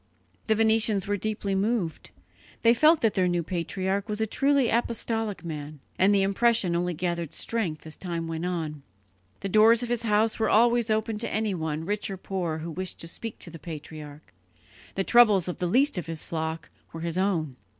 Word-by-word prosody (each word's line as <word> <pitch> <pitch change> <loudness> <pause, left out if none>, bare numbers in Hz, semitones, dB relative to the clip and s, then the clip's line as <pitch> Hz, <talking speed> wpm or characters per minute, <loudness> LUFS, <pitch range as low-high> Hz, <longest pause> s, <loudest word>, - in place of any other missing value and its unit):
The 220 - +3
Venetians 220 -2 +3
were 205 - 0
deeply 205 -1 -2
moved; 195 -4 -1 0.5
they 230 0 +6
felt 310 +6 +5
that 225 -2 +2
their 185 -1 +2
new 175 -1 0
patriarch 190 +4 -2
was 210 0 -2
a 220 - +2
truly 275 +3 +2
apostolic 225 -4 -1
man, 150 -2 -6 0.2
and 190 +2 +5
the 200 -1 +3
impression 200 -2 +2
only 175 0 -1
gathered 170 -2 -3
strength 185 -11 -3
as 155 - -7
time 170 -3 -4
went 165 0 -4
on. 160 -5 -3 0.6
The 195 - -3
doors 220 +4 +5
of 240 - -4
his 240 -1 0
house 220 0 +1
were 220 - +2
always 235 +1 +4
open 215 0 0
to 230 - -2
anyone, 165 -8 -2
rich 205 +3 -2
or 195 - -5
poor, 180 -4 -3
who 165 +1 -6
wished 185 +3 -4
to 165 - -5
speak 225 +6 -6
to 170 - -6
the 165 - -10
patriarch; 150 - -9 0.6
the 195 - 0
troubles 210 -6 +5
of 180 - -4
the 180 - 0
least 260 +3 +3
of 170 - -7
his 165 -1 -3
flock 160 0 -4 0.2
were 165 - -7
his 170 +1 -1
own. 165 -8 0
195 Hz, 190 wpm, -26 LUFS, 165-220 Hz, 0.6 s, they